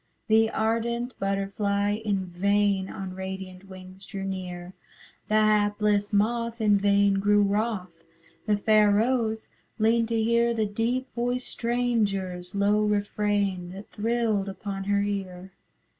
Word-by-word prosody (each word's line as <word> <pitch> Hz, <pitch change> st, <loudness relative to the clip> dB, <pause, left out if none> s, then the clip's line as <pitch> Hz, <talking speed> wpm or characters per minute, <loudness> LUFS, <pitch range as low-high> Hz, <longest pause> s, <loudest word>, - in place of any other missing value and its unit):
The 220 Hz, 0 st, +4 dB
ardent 235 Hz, +3 st, -1 dB
butterfly 200 Hz, +1 st, 0 dB
in 205 Hz, -3 st, -1 dB
vain 195 Hz, +2 st, +1 dB
On 190 Hz, -1 st, -6 dB
radiant 190 Hz, 0 st, -7 dB
wings 185 Hz, 0 st, -12 dB
drew 195 Hz, -2 st, -6 dB
near; 180 Hz, -2 st, -5 dB, 0.5 s
The 215 Hz, -, 0 dB
hapless 210 Hz, -1 st, +2 dB
moth 230 Hz, +3 st, 0 dB
in 210 Hz, -2 st, +3 dB
vain 200 Hz, 0 st, +3 dB
grew 205 Hz, +1 st, +3 dB
wrothâ 205 Hz, -1 st, -1 dB, 0.6 s
The 210 Hz, -1 st, +3 dB
fair 215 Hz, 0 st, +4 dB
rose 220 Hz, +1 st, +1 dB, 0.3 s
leaned 225 Hz, +1 st, +2 dB
to 230 Hz, 0 st, 0 dB
hear 235 Hz, +1 st, +2 dB
The 220 Hz, -1 st, +1 dB
deep 230 Hz, +5 st, -1 dB
voiced 245 Hz, +1 st, -2 dB
strangerâs 200 Hz, -7 st, -1 dB
low 205 Hz, +1 st, +2 dB
refrain 205 Hz, -3 st, 0 dB
That 195 Hz, +2 st, -10 dB
thrilled 220 Hz, -2 st, 0 dB
upon 195 Hz, 0 st, -5 dB
her 200 Hz, 0 st, +1 dB
ear. 190 Hz, -2 st, -4 dB
205 Hz, 130 wpm, -26 LUFS, 195-220 Hz, 0.6 s, The